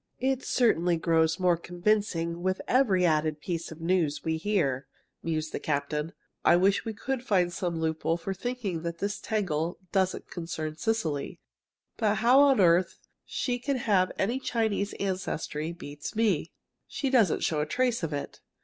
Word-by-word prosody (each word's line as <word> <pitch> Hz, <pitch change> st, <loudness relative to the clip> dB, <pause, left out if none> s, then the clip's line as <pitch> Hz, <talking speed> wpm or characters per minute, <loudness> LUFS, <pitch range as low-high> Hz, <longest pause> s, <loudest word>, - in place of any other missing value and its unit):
"It 265 Hz, 0 st, 0 dB
certainly 180 Hz, -8 st, +2 dB
grows 160 Hz, 0 st, +2 dB
more 180 Hz, -2 st, +4 dB
convincing 175 Hz, -1 st, -1 dB
with 185 Hz, +1 st, 0 dB
every 210 Hz, -9 st, +3 dB
added 155 Hz, -2 st, +1 dB
piece 170 Hz, +1 st, -4 dB
of 160 Hz, -, -9 dB
news 165 Hz, -4 st, +1 dB
we 160 Hz, 0 st, 0 dB
hear," 160 Hz, -8 st, 0 dB, 0.3 s
mused 155 Hz, -1 st, -2 dB
the -, -, -3 dB
captain. 150 Hz, +2 st, -2 dB, 0.3 s
"I -, -, +6 dB
wish 190 Hz, +3 st, +3 dB
we 225 Hz, -, -3 dB
could 260 Hz, +3 st, -3 dB
find 180 Hz, -6 st, +2 dB
some 175 Hz, -3 st, -2 dB
loophole 160 Hz, +1 st, 0 dB
for 195 Hz, +3 st, -4 dB
thinking 205 Hz, -5 st, -3 dB
that 170 Hz, 0 st, -4 dB
this 205 Hz, +3 st, -2 dB
tangle 175 Hz, -6 st, -1 dB
doesn't 190 Hz, -1 st, 0 dB
concern 160 Hz, -3 st, -4 dB
Cecily. 160 Hz, -10 st, -2 dB, 0.6 s
But 210 Hz, -1 st, +2 dB
how 240 Hz, +5 st, +5 dB
on 280 Hz, -3 st, +5 dB
earth 175 Hz, -1 st, +4 dB, 0.3 s
she 245 Hz, -1 st, -2 dB
can 275 Hz, +2 st, -1 dB
have 200 Hz, -6 st, +2 dB
any 235 Hz, +7 st, 0 dB
Chinese 220 Hz, -5 st, -1 dB
ancestry, 170 Hz, -5 st, -3 dB
beats 150 Hz, -1 st, -8 dB
me. 205 Hz, -8 st, +1 dB, 0.4 s
She 270 Hz, -2 st, -2 dB
doesn't 225 Hz, -, +3 dB
show 155 Hz, -2 st, +1 dB
a 150 Hz, -, -2 dB
trace 250 Hz, +3 st, +1 dB
of 165 Hz, -2 st, -2 dB
it. 145 Hz, -1 st, -5 dB
180 Hz, 160 wpm, -28 LUFS, 160-215 Hz, 0.6 s, I